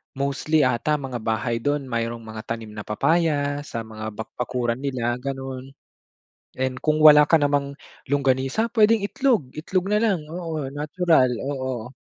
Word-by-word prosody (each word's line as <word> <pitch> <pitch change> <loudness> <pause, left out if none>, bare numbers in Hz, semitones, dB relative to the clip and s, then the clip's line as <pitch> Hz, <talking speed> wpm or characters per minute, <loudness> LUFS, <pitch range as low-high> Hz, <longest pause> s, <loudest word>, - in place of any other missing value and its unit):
mostly 140 +2 +1
'ata 130 +4 +1
mga 135 -4 -4
bahay 115 +1 -1
dun, 145 +3 -1
mayroon 115 0 -3
mga 110 0 -8
tanim 115 -2 -5
na 105 -1 -8
papaya 145 +3 +1
sa 115 -4 -5
mga 110 -1 -7
bak 110 - -6
bakuran 125 -1 -1
nila, 125 -3 -2
ganon. 135 0 -6 0.8
And 130 0 -1
kung 155 0 +1
wala 150 -1 +9
ka 165 - +6
namang 140 -1 0 0.3
longganisa, 135 - +1
pwedeng 220 0 +5
itlog 230 - +1
itlog 180 +4 -1
na 210 +1 +2
lang, 190 -9 +1
oo, 160 -4 -4
natural, 150 -2 +2
oo. 130 -3 -4
135 Hz, 150 wpm, -23 LUFS, 120-155 Hz, 0.8 s, wala